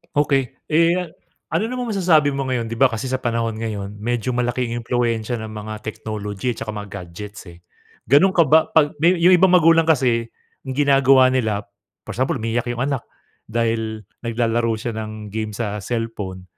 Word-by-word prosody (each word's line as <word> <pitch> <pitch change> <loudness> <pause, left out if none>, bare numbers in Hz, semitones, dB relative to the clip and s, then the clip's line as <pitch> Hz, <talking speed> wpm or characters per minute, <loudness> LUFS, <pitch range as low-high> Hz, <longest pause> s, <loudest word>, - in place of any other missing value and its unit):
Okey. 140 -2 +3 0.2
Eh, 165 +2 +4
a 180 - -4 0.5
ano 220 +7 0
namang 245 -4 -3
masasabi 155 -7 +3
mo 135 - -1
ngayon, 125 -3 -2
'di 115 - -5
ba 130 +1 +4
kasi 115 +4 -4
sa 130 - -1
panahon 115 -3 -1
ngayon 105 -3 -5
medyo 120 +3 -2
malaking 120 -1 -1
impluwensiya 115 -1 -1
ng 110 - -6
mga 110 0 -6
technology 105 +1 -4
'tsaka 115 - -7
mga 105 0 -6
gadgets, 95 +3 -10
eh. 85 0 -14 0.5
Ganun 185 +7 +5
ka 170 - +6
ba, 160 +2 +4
pag 150 -2 +3
may 170 +4 +4
yung 175 +1 +4
ibang 185 0 +6
magulang 165 -1 +5
kasi 125 -7 +2 0.4
ginagawa 135 -1 +4
nila, 110 -5 0 0.4
for - - -7
example 130 +2 0
umiiyak 115 +2 -2
yung 120 +1 -2
anak 135 -3 -2 0.4
dahil 110 -1 -1 0.2
naglalaro 115 -1 0
siya 115 +2 -4
ng 110 -1 -7
game 110 0 -4
sa 105 -2 -3
cellphone, 105 -4 -4
120 Hz, 170 wpm, -21 LUFS, 110-140 Hz, 0.5 s, ka